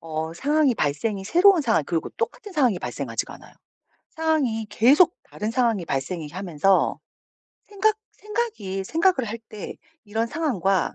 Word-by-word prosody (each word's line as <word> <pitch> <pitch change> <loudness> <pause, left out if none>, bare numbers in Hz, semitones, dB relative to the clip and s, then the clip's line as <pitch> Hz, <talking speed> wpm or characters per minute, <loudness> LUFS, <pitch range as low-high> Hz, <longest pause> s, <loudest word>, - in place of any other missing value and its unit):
어 160 0 -4
상황이 290 - +2
발생이 190 +5 -1
새로운 355 - +5
상황 225 - +2
그리고 165 +1 -2
똑같은 460 -2 -4
상황이 255 - +2
발생하지가 120 -4 -4
않아요. - - -16 0.6
상황이 290 -9 0
계속 295 +10 +5
다른 210 +1 -4
상황이 230 -7 +1
발생이 150 +3 -3
하면서 185 +1 +1 0.7
생각 420 +1 +1
생각이 405 - -4
생각을 330 - +2
할 225 - -5
때 210 -2 -7 0.3
이런 220 +2 -1
상황과 200 - 0
225 Hz, 330 characters per minute, -24 LUFS, -, 0.7 s, 새로운